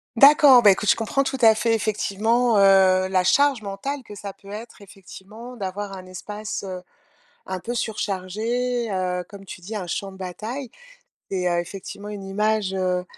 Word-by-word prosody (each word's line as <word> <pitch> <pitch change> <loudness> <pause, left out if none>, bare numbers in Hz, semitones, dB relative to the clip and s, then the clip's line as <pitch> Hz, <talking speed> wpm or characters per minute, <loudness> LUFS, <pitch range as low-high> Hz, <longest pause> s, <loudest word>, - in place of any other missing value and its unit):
D'accord. 275 -1 +8
Bah, 205 - +8
écoute 205 +2 0
je - - +6
comprends 230 +5 0
tout 265 0 -3
à 220 -1 +7
fait, 225 0 +1
effectivement, 220 +2 +1
heu, 190 -1 +5
la 185 -1 +1
charge 280 +2 +3
mentale 215 +8 -5
que 210 - -11
ça 200 -1 -7
peut 200 - -17
être, 215 +1 -9
effectivement, 200 +5 -12
d'avoir 200 -1 -5
un 185 -1 -10
espace, 210 +4 -6
heu, 185 -1 -6 0.7
un 185 0 -4
peu 235 +6 -5
surchargé. 225 +3 -2
Heu, 180 -1 -2
comme 200 -1 -12
tu 185 - -10
dis, 205 +5 -8
un 190 -4 -4
champ 195 +2 -4
de - - -13
bataille 220 +8 -6 0.6
est, 180 -2 0
heu, 175 0 +1
effectivement, 195 +3 -8
une 205 -2 -7
image, 210 0 0
heu 180 -1 -1
205 Hz, 180 wpm, -23 LUFS, 190-230 Hz, 0.7 s, D'accord